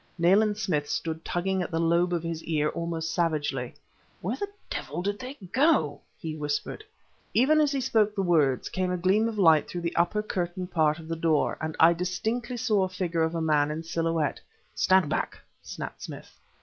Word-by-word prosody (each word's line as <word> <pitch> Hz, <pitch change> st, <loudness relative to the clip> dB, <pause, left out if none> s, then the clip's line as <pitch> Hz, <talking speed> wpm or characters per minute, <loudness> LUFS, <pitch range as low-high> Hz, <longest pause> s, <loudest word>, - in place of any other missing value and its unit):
Nayland 200 Hz, +5 st, +4 dB
Smith 165 Hz, -9 st, -1 dB
stood 160 Hz, 0 st, -3 dB
tugging 190 Hz, +2 st, -1 dB
at 175 Hz, -, -3 dB
the 165 Hz, -2 st, -1 dB
lobe 170 Hz, +2 st, +2 dB
of 170 Hz, -2 st, -1 dB
his 165 Hz, -1 st, -4 dB
ear 150 Hz, -2 st, +1 dB
almost 165 Hz, -1 st, -3 dB
savagely. 150 Hz, -7 st, -1 dB, 0.4 s
"Where 205 Hz, +8 st, -2 dB
the 405 Hz, -, -3 dB, 0.2 s
devil 150 Hz, +6 st, -4 dB
do 205 Hz, +1 st, 0 dB
they 255 Hz, +6 st, -8 dB, 0.2 s
go?" 260 Hz, -, +2 dB, 0.2 s
he 160 Hz, -1 st, -5 dB
whispered. 150 Hz, -, -3 dB, 0.5 s
Even 300 Hz, +6 st, +5 dB
as 295 Hz, -2 st, +2 dB
he 275 Hz, -, 0 dB
spoke 215 Hz, -4 st, +2 dB
the 195 Hz, -, 0 dB
words, 150 Hz, -8 st, +2 dB
came 185 Hz, -1 st, -1 dB
a 180 Hz, -, 0 dB
gleam 195 Hz, +5 st, +2 dB
of 225 Hz, -2 st, -4 dB
light 160 Hz, -6 st, +5 dB
through 175 Hz, -, -4 dB
the 170 Hz, 0 st, -3 dB
upper 175 Hz, +5 st, +1 dB
curtained 180 Hz, -2 st, -3 dB
part 155 Hz, -2 st, +2 dB
of 160 Hz, -1 st, -11 dB
the 165 Hz, -, -2 dB
door, 160 Hz, -2 st, +1 dB
and 160 Hz, 0 st, -3 dB
I 165 Hz, +1 st, +7 dB
distinctly 220 Hz, +8 st, -2 dB
saw 205 Hz, -4 st, +2 dB
the 185 Hz, -, -14 dB
figure 170 Hz, -3 st, -1 dB
of 160 Hz, +1 st, 0 dB
a 165 Hz, -, -1 dB
man 150 Hz, -2 st, +2 dB
in 155 Hz, +2 st, -4 dB
silhouette. 165 Hz, -2 st, -1 dB, 0.3 s
"Stand 185 Hz, -3 st, +3 dB
back!" -, -, -2 dB, 0.2 s
snapped -, -, -7 dB
Smith. -, -, -9 dB
170 Hz, 195 wpm, -27 LUFS, 160-195 Hz, 0.5 s, I